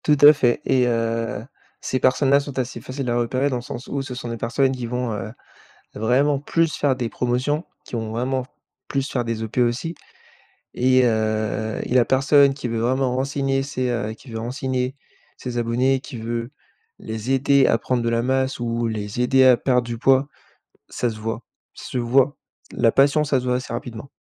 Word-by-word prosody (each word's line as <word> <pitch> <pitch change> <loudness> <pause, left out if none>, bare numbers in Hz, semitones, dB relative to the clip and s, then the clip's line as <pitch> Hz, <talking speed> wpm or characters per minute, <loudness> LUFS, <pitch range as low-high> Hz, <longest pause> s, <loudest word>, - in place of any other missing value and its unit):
Tout 150 -1 +4
à 145 +1 +10
fait 125 -5 +1
et 130 -2 +3
heu, 115 -1 -1 0.3
ces 130 - -2
personnes-là 135 +2 +4
sont 140 -1 -7
assez 130 -1 -3
faciles 130 -1 -4
à 120 - +1
repérer 130 +4 0
dans 130 - -1
le - - -5
sens 120 +1 -8
où 140 - -2
ce 130 -2 -6
sont 125 -1 -6
des 115 - -4
personnes 125 +4 +1
qui 125 -3 -4
vont, 125 -1 -2
heu, 105 +1 -5 0.6
vraiment 130 +6 +2
plus 165 +3 0
faire 140 -2 +2
des 125 -2 -3
promotions, 125 +7 -1 0.2
qui - - -9
vont 110 -1 -3
vraiment 130 +3 -1 0.4
plus 135 0 -2
faire 125 -2 -1
des 115 -1 -3
OP 110 +2 -5
aussi 125 +7 0 0.8
et 130 +1 +3
heu, 110 -1 0
la 125 -1 +3
personne 140 +2 +4
qui 135 -2 -5
veut 115 -1 -2
vraiment 125 +2 +1
renseigner 135 0 0
ses 130 -2 -2
heu, 115 -3 -2
qui 120 - -15
veut 110 - -4
renseigner 130 +2 -2 0.4
ses 125 -1 -5
abonnés, 125 +3 +1
qui 130 -2 -8
veut 115 +2 -4 0.5
les 110 +3 -4
aider 135 0 +4
à - - +3
prendre 125 -2 -1
de 115 - +1
la 115 0 +1
masse 130 +1 0
ou 115 0 -1
les 105 +1 -3
aider 130 +1 +4
à 130 -1 +8
perdre 125 0 +1
du 120 0 -5
poids, 135 +3 +3 0.6
ça 120 - -1
se 110 - -8
voit 115 +2 -4 0.3
ça - - -11
se - - -2
voit, 130 +4 +2 0.4
la 115 - +3
passion 140 +5 +4
ça 140 -2 +1
se 125 - -4
voit 125 0 +1
assez 125 -2 -5
rapidement. 120 +1 -6
125 Hz, 200 wpm, -22 LUFS, 115-135 Hz, 0.8 s, à